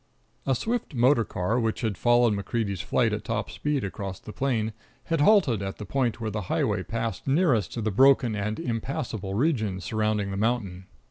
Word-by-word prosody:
A 135 - +3
swift 225 - -2
motor 120 0 +4
car, 105 +4 -1
which 115 -2 -1
had 110 -4 -1
followed 120 +1 +4
MacCreedy's 100 -1 -2
flight - - +1
at - - -3
top - - -3
speed 150 -2 -1
across 95 -1 -5
the 105 - -10
plain, 115 -3 -1 0.3
had 165 -3 0
halted 150 - +4
at 95 0 -4
the 105 - -7
point 125 +1 0
where 110 -2 -3
the 105 +1 -3
highway 105 -3 +1
passed 115 +5 -4
nearest 135 - +2
to 115 - -3
the 110 - 0
broken 130 0 +4
and 105 +1 -2
impassable 115 - -3
region 110 - 0
surrounding 105 +1 -1
the 95 - -3
mountain. 100 -5 -1
115 Hz, 185 wpm, -26 LUFS, 100-130 Hz, 0.3 s, motor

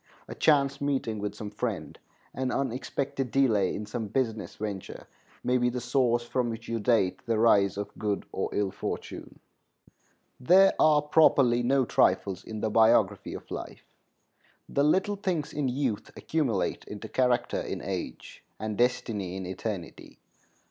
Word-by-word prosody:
A - - -6
chance 140 -2 +2
meeting 135 -6 -1
with 105 0 -4
some 105 -1 -7
friend, 110 -1 -4 0.3
an 130 -1 -2
unexpected 135 +1 -2
delay 110 -8 +2
in 105 - -5
some 110 +1 -4
business 110 -1 -2
venture, 100 -3 -6 0.4
may 125 0 +2
be 125 0 +2
the 125 +1 -3
source 120 -1 +1
from 120 0 -1
which 115 0 -6
you 115 0 -2
date 105 -4 +1
the 115 -1 +1
rise 100 -4 +4
of 100 - -5
good 105 -2 -1
or - - -2
ill 100 -2 0
fortune. - - -6 1.0
There 185 +9 +6
are 150 -1 +5
properly 140 -5 +4
no 130 +2 +2
trifles 95 -2 +1
in 110 -1 -7
the 110 - -1
biography 110 +1 +3
of - - -11
life. - - -7 0.8
The 140 - +1
little 190 +7 +2
things 180 -7 -2
in 145 -2 -1
youth 125 -4 -2
accumulate 135 -11 -1
into 105 -1 -8
character 125 -2 +1
in - - -4
age - - -6 0.2
and 110 -1 -3
destiny 110 -6 0
in 95 -1 -5
eternity. 95 -1 -6
120 Hz, 150 wpm, -28 LUFS, 105-135 Hz, 1.0 s, There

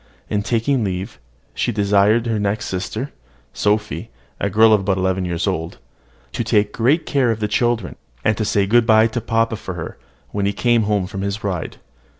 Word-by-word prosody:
In 105 -1 +1
taking 120 +4 0
leave, 95 -1 -4 0.3
she 120 - -1
desired 105 +2 +3
her 115 -2 0
next 105 +1 -1
sister, 110 +8 -4 0.4
Sophy, 105 +1 -1 0.3
a 100 - 0
girl 110 +2 +5
about 95 -2 +2
eleven 95 0 0
years 85 -1 -2
old, 80 +1 -2 0.5
to - - -2
take 105 -2 +1
great 135 +8 +2
care 135 -4 +1
of 115 -1 0
the 105 - 0
children, 115 -2 0 0.3
and 110 - +3
to 110 - -2
say 100 -1 +1
good 115 +3 +3
bye 110 -1 +6
to 115 +1 -2
papa 115 0 0
for 95 -4 -7
her 80 -2 -7 0.3
when 100 -1 -1
he 100 - 0
came 120 +1 +2
home 100 -3 +1
from 95 +1 -6
his 100 +2 -3
ride. 95 -5 -3
105 Hz, 185 wpm, -20 LUFS, 100-115 Hz, 0.5 s, bye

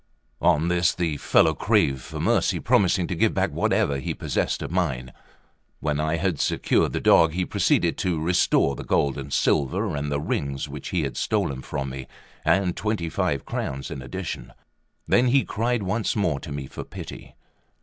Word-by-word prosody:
On 75 +3 +3
this 90 0 +2
the 85 -4 -1
fellow - - +4
craved 70 -2 +1
for - - -7
mercy, - - +2
promising 95 -2 +2
to 90 - -3
give 85 - +1
back - - +1
whatever 70 -1 +1
he 65 - -3
possessed - - -1
of - - -5
mine. 65 -9 -1 0.7
When 75 -1 -1
I 80 +1 0
had 85 -2 -1
secured - - +1
the - - 0
dog, 80 -1 +5
he 90 +1 -1
proceeded - - +1
to 90 -4 0
restore 80 -4 +2
the - - -7
gold 70 -1 +1
and 70 0 -7
silver 70 +1 +1
and 70 0 -3
the 70 - 0
rings 70 -1 -2
which 70 0 -7
he 90 -4 0
had 70 - -4
stolen 65 -2 -1
from 70 -1 -4
me, 65 0 -7 0.4
and 95 -3 +2
twenty 105 -6 -2
five 90 -6 -1
crowns 70 0 -4
in 65 - -5
addition. 65 -1 -6 0.5
Then 125 +1 +4
he 135 +2 +3
cried 115 +1 -1
once 105 +4 -1
more 85 -9 0
to 75 - -9
me 70 -1 -4
for - - -7
pity. - - -10
80 Hz, 180 wpm, -24 LUFS, 70-90 Hz, 0.7 s, dog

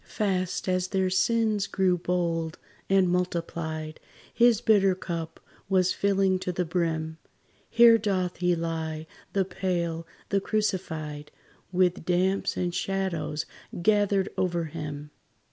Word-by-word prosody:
Fast 185 -4 -1
as 185 0 +1
their 190 -1 0
sins 210 +1 +2
grew 190 -2 +2
bold 170 -2 -1 0.3
and 190 -1 +4
multiplied, 165 -3 -2 0.3
His 235 -3 +5
bitter 200 -5 +4
cup 170 -3 -5 0.3
was 185 -2 +3
filling 195 -1 +2
to 185 - -2
the 180 0 -1
brim. 160 -1 -2 0.5
Here 235 -1 +7
doth 185 -4 -1
he 180 0 +2
lie, 160 -1 -3 0.3
the 195 -1 +2
pale, 170 -3 -2 0.2
the 200 -1 +1
crucified, 160 -9 -2 0.4
With 180 -2 +2
damps 185 +3 +1
and 175 -1 -1
shadows 180 -5 -2 0.4
gathered 205 -2 +3
over 175 -2 0
him. 150 -2 -6
180 Hz, 120 wpm, -27 LUFS, 165-195 Hz, 0.5 s, Here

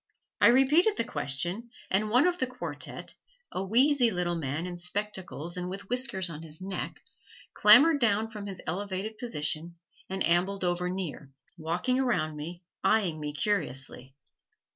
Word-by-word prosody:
I - - +8
repeated 295 - +5
the - - +1
question 175 - -2 0.2
and 210 +3 +2
one 250 +6 +4
of 360 0 +1
the 260 - +1
quartette, 255 0 -5 0.4
a 185 - -3
wheezy 250 +5 +4
little 180 -3 -1
old 165 - -3
man 145 +4 -3
in 180 -1 -5
spectacles 180 -2 -4
and 180 0 -3
with 195 +1 -7
whiskers 245 -7 +1
on 160 -2 -7
his 160 -1 -11
neck, 190 0 -5 0.5
clambered 315 0 +7
down 220 -2 +2
from 210 -2 -7
his 190 -2 -6
elevated 200 +4 -4
position 165 -6 -1 0.3
and 190 0 0
ambled 185 +3 +1
over 180 0 0
near, 180 -6 -5 0.3
walking 175 +10 -1
around 200 -12 0
me, 170 +4 -7 0.2
eying 190 -8 +2
me 150 -1 -4
curiously. 135 -7 -2
190 Hz, 155 wpm, -29 LUFS, 170-225 Hz, 0.5 s, I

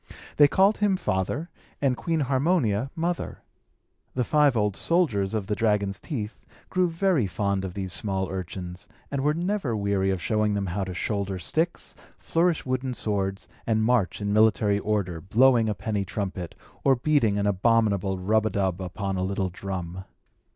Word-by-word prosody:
They 145 - +8
called 195 +7 +3
him 205 -2 +2
father, 110 - -2 0.3
and 135 -3 +2
Queen 160 +7 -1
Harmonia 135 - +1
mother. 170 +1 -3 0.7
The 125 - +1
five 145 -1 +3
old 105 -2 +1
soldiers 115 - +1
of 105 -3 -1
the 105 - -2
dragon's 105 -3 +1
teeth 115 -9 -5 0.3
grew 185 -1 +2
very 165 - +1
fond 100 +1 -1
of 95 -2 -5
these 95 -2 -3
small 95 -2 -1
urchins, 90 -1 -6 0.2
and 140 -1 -1
were 150 +2 +2
never 175 - -1
weary 100 -1 +1
of 95 -1 0
showing 105 +3 +1
them 100 -1 -1
how 95 +2 -2
to 90 -1 -6
shoulder 100 -1 -2
sticks, 160 - -1 0.2
flourish 170 0 +1
wooden 130 0 -2
swords, 95 -3 -2 0.2
and 110 -1 +2
march 115 -5 +1
in 100 0 -1
military 105 -1 +3
order, 100 -6 -1
blowing 115 +3 +4
a 105 - -1
penny 100 +1 -2
trumpet, 95 -3 -4 0.3
or 135 -1 +5
beating 120 -6 +2
an 100 - 0
abominable 100 -1 +2
rub 110 +4 +2
a - - 0
dub 95 -2 -1
upon 95 +1 -3
a 90 - -1
little 95 0 -1
drum. 95 -1 -5
105 Hz, 165 wpm, -26 LUFS, 95-135 Hz, 0.7 s, They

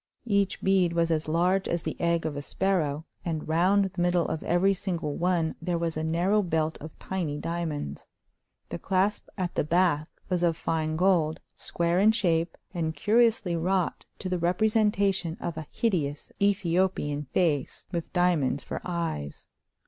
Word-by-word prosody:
Each 200 -3 +1
bead 190 -3 +3
was 170 0 +1
as 155 -1 0
large 180 +4 +2
as 170 -1 -1
the - - -3
egg 170 -1 +1
of 155 -2 -2
a 145 - -3
sparrow, 160 -3 0 0.2
and 160 -3 -3
round 185 +5 +3
the 180 -2 -4
middle 175 -1 +2
of 160 - -3
every 185 +3 +3
single 175 -6 -3
one 170 -2 +1
there 175 +1 -1
was 165 -1 -2
a 155 - -2
narrow 175 +6 +2
belt 160 -3 0
of 155 +2 -9
tiny 170 -6 -3
diamonds. 155 - -4 0.6
The 85 - -5
clasp 195 +2 0
at 180 -2 -2
the - - +1
back 160 -1 +2 0.2
was 180 -2 0
of 170 -2 +2
fine 155 -1 -1
gold, 165 -3 +2 0.2
square 170 +1 0
in 210 +3 +6
shape, 170 -6 +1 0.2
and 160 -3 -2
curiously 215 0 +2
wrought 180 +2 0
to - - -5
the 180 -1 -1
representation 195 -1 +1
of 170 - -4
a 155 -2 -6
hideous 155 -10 -1
Ethiopian 185 -6 +1
face, 145 -2 0
with 170 -2 -4
diamonds 170 -7 +1
for - - -5
eyes. 165 - -4
170 Hz, 165 wpm, -27 LUFS, 160-190 Hz, 0.6 s, in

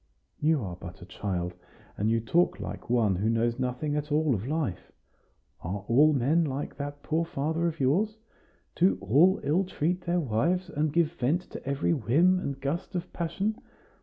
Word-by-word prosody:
"You 155 -4 +2
are 90 -3 -5
but 90 0 -10
a - - -9
child, 90 -2 -3 0.4
and 105 +2 0
you 115 0 +2
talk 165 +11 +1
like - - -7
one 115 -5 +3
who 105 +4 +1
knows 115 +1 +1
nothing 130 +4 -1
at 150 0 -3
all 150 -1 +3
of 110 +2 -3
life. 145 - -2 0.7
Are 95 +4 -4
all 145 +6 +5
men 150 +5 +2
like 140 -1 -3
that 145 0 -6
poor 160 +1 0
father 160 +2 -1
of 165 -1 -4
yours? 190 +12 +1 0.6
Do 185 +3 +3
all 145 - +4
ill 165 +7 +2
treat 180 -1 -1
their 175 +1 0
wives, 165 +8 0
and 150 +1 0
give 165 0 +2
vent 170 +2 0
to - - -8
every 140 +4 +1
whim 165 - +3
and 140 -5 -4
gust 165 +8 -3
of 175 - -4
passion? 195 +6 -2
145 Hz, 180 wpm, -28 LUFS, 120-170 Hz, 0.7 s, all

